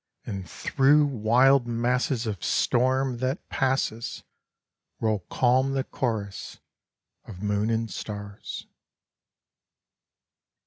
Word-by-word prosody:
And 95 -2 -5
through 145 +2 +3
wild 130 +1 +4
masses 120 +2 0
of 100 -6 -4
storm, 130 +1 +1
that 130 +2 -2
passes, 130 -4 -1 0.8
Roll 110 -2 +1
calm 130 +2 +2
the 135 -1 0
chorus 110 -8 -4 0.7
of 95 -2 -10
moon 105 +1 0
and 115 0 0
stars. 105 -1 -7
120 Hz, 90 wpm, -26 LUFS, 110-130 Hz, 0.8 s, wild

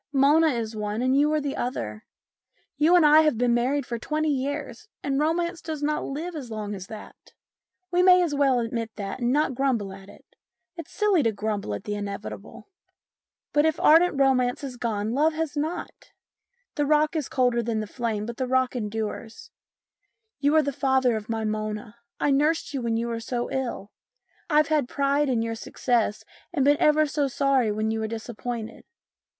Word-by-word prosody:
Mona 295 +4 +4
is 230 -6 -2
one, 210 +2 -2
and 255 +1 +2
you 295 +2 +3
are 310 - +2
the 285 -1 -3
other. 110 - -4 0.7
You 310 +5 +4
and 345 -3 +6
I 300 +1 +7
have 305 -7 +2
been 245 0 +2
married 255 +3 +1
for 235 -1 -4
twenty 310 +4 -1
years, 280 - -4 0.2
and 275 -1 0
romance 340 +3 0
does 310 -2 -5
not 300 +1 0
live 325 +5 -5
as 270 -6 -6
long 210 -2 -4
as 190 -1 -7
that. 215 -1 -12 0.6
We 355 0 +3
may 365 0 +6
as 325 -4 -1
well 275 -3 +3
admit 230 -1 -3
that 200 +3 -5
and 240 0 +1
not 295 0 +2
grumble 240 -7 -1
at 195 0 -13
it; - - -16 0.5
it's 335 -4 -8
silly 410 -5 +2
to 230 -4 +2
grumble 205 - -3
at - - -8
the 210 - -4
inevitable. 205 - -7 0.9
But 295 - +4
if 315 - -1
ardent 325 -2 +5
romance 260 0 +2
has 270 -3 -6
gone, 220 -3 -2
love 300 +6 +2
has 315 -1 -3
not. 310 +4 -4 0.6
The 290 -1 -1
rock 305 +2 +3
is 305 -5 -2
colder 245 -2 +2
than 230 -1 -2
the 215 - -3
flame, 220 -2 -3
but 235 +1 -6
the 260 - -2
rock 260 0 +1
endures. 220 0 -5 0.9
You 290 +2 +2
are 310 - +5
the 280 0 -2
father 265 -3 +2
of 215 0 -6
my 225 -1 -2
Mona. 215 +1 -4 0.2
I 290 - +2
nursed 295 +2 +1
you 270 - -2
when 230 -1 0
you 230 - -1
were 230 -1 -3
so 240 +1 -3
ill. 240 -6 -3 0.6
I've 300 -1 +3
had 300 -5 +1
pride 280 0 +1
in 235 -3 +1
your 230 0 -2
success 225 -1 -1 0.3
and 285 -6 +1
been 290 +1 +5
ever 305 0 +4
so 290 -1 0
sorry 270 -4 +1
when 215 +1 -1
you 225 - -2
were 220 - -2
disappointed. 230 0 -6
260 Hz, 190 wpm, -25 LUFS, 225-295 Hz, 0.9 s, I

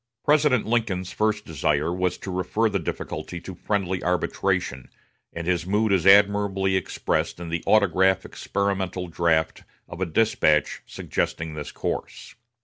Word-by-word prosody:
President 145 -5 +3
Lincoln's 110 -6 -1
first 105 -1 0
desire 75 +1 0
was 90 0 -1
to 95 - -7
refer 95 +5 0
the 100 -2 -1
difficulty 85 +1 -5
to 95 - -8
friendly 95 0 -2
arbitration, 75 -6 -1 0.4
and 85 - -6
his 90 -1 0
mood 105 +2 +1
is 95 -2 +2
admirably 100 -1 +4
expressed 95 -1 -1
in 85 -1 -6
the 85 0 -3
autograph 95 -2 +3
experimental 95 -2 -2
draft 80 -2 0 0.2
of 85 +2 -9
a 95 - 0
despatch 80 -5 +2
suggesting 80 -1 -3
this 75 -1 -6
course. - - -5
95 Hz, 140 wpm, -24 LUFS, 85-100 Hz, 0.4 s, admirably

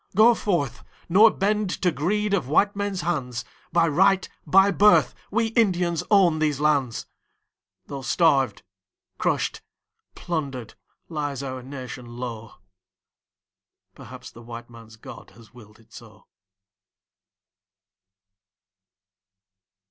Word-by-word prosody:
Go 225 +4 +7
forth, 170 - -2 0.3
nor 210 +6 +7
bend 210 0 -1
to 180 - +3
greed 205 +7 -1
of 175 -10 0
white 200 +8 +2
men's 200 -2 -3
hands, 125 -8 -3 0.3
By 165 0 +3
right, 190 +5 +3 0.2
by 195 +5 +5
birth 210 +2 +4 0.2
we 225 +2 0
Indians 180 -7 +1
own 185 -6 +4
these 150 -3 0
lands, 140 -6 0 0.8
Though 140 -1 -7
starved, 135 - +1 0.6
crushed, - - -1 0.5
plundered, 140 -9 -4 0.3
lies 145 -4 -4
our 130 -1 -5
nation 125 -2 -9
low... 115 -3 -7 1.4
Perhaps 125 +1 -12
the 120 - -14
white 120 0 -10
man's 115 -1 -14
God 110 - -12
has 115 -1 -18
willed 110 -3 -16
it 115 - -24
so. - - -14
150 Hz, 110 wpm, -24 LUFS, 125-195 Hz, 1.4 s, Go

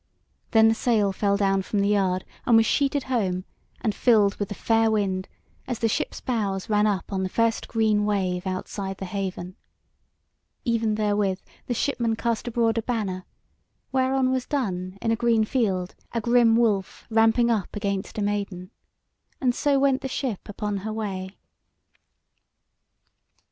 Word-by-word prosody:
Then 220 -1 +6
the 225 - +4
sail 220 -3 +2
fell 200 +1 +1
down 195 -1 +2
from 205 - -3
the 200 0 +2
yard 190 -3 +1 0.2
and 235 -2 +6
was 225 - +5
sheeted 280 +2 +1
home 195 -8 -1 0.4
and 220 -3 0
filled 210 -5 +4
with 205 - -3
the 205 - -5
fair 225 +2 +2
wind 195 -3 0 0.4
as 245 - -2
the 225 - +1
ship's 220 - -2
bows 205 -5 -2
ran 210 0 +4
up 200 -1 -2
on 190 - 0
the 190 - -1
first 230 +2 0
green 215 -2 +2
wave 190 -3 -1
outside 190 +1 -4
the 195 - -5
haven. 185 -1 -4 1.1
Even 225 -3 +1
therewith 205 -3 0 0.3
the 245 - -1
shipmen 235 -3 0
cast 230 +1 -2
abroad 230 -1 +1
a - - -1
banner, 205 -6 -3 0.7
whereon 260 0 +2
was 260 -1 -1
done 185 -9 -2
in 225 - +1
a - - +3
green 230 -1 +2
field 195 -6 -1 0.2
a 230 - 0
grim 235 0 +4
wolf 215 -5 0
ramping 225 +2 +4
up 215 -3 -1
against 200 -1 -3
a 210 - 0
maiden, 200 -2 -3 0.7
and 250 -2 +2
so 280 +2 +2
went 270 0 +2
the 270 - -3
ship 255 -7 -4
upon 205 0 -3
her 210 +3 -4
way. 195 -3 -4
215 Hz, 160 wpm, -25 LUFS, 195-230 Hz, 1.1 s, Then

